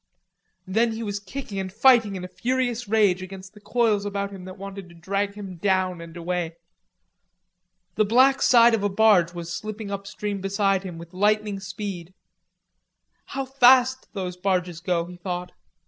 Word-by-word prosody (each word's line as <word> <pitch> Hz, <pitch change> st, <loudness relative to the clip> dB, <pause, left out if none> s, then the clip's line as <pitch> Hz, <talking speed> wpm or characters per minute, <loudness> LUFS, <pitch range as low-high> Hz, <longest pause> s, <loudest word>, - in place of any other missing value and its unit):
Then 225 Hz, +4 st, +1 dB
he 225 Hz, +1 st, -5 dB
was 205 Hz, -1 st, -3 dB
kicking 200 Hz, 0 st, -6 dB
and 190 Hz, -1 st, -4 dB
fighting 225 Hz, -2 st, +4 dB
in 185 Hz, -, -6 dB
a -, -, -5 dB
furious 240 Hz, +5 st, -2 dB
rage 200 Hz, -4 st, +3 dB
against 190 Hz, +1 st, -9 dB
the 210 Hz, -, -16 dB
coils 220 Hz, -3 st, +1 dB
about 200 Hz, 0 st, -3 dB
him 190 Hz, -2 st, -9 dB
that 185 Hz, +1 st, -9 dB
wanted 195 Hz, -1 st, -8 dB
to 170 Hz, -, -15 dB
drag 200 Hz, +4 st, -2 dB
him 195 Hz, -4 st, -8 dB
down 185 Hz, -1 st, 0 dB
and 170 Hz, 0 st, -10 dB
away. 170 Hz, -1 st, -3 dB, 1.4 s
The 215 Hz, -, +2 dB
black 260 Hz, +5 st, +4 dB
side 235 Hz, -3 st, +6 dB
of 225 Hz, -, +1 dB
a 205 Hz, -, +1 dB
barge 195 Hz, -4 st, +4 dB
was 170 Hz, 0 st, -5 dB
slipping 215 Hz, -1 st, -6 dB
up 200 Hz, 0 st, -5 dB
stream 205 Hz, -1 st, -4 dB
beside 195 Hz, 0 st, +1 dB
him 180 Hz, -3 st, -7 dB
with 170 Hz, +1 st, -11 dB
lightning 210 Hz, +1 st, +1 dB
speed. 190 Hz, -2 st, -6 dB, 1.1 s
How 270 Hz, 0 st, -4 dB
fast 260 Hz, 0 st, +4 dB
those 180 Hz, -2 st, -4 dB
barges 180 Hz, -2 st, -1 dB
go, 175 Hz, -1 st, -1 dB
he 180 Hz, 0 st, -11 dB
thought. 180 Hz, 0 st, -5 dB
195 Hz, 170 wpm, -24 LUFS, 180-215 Hz, 1.4 s, side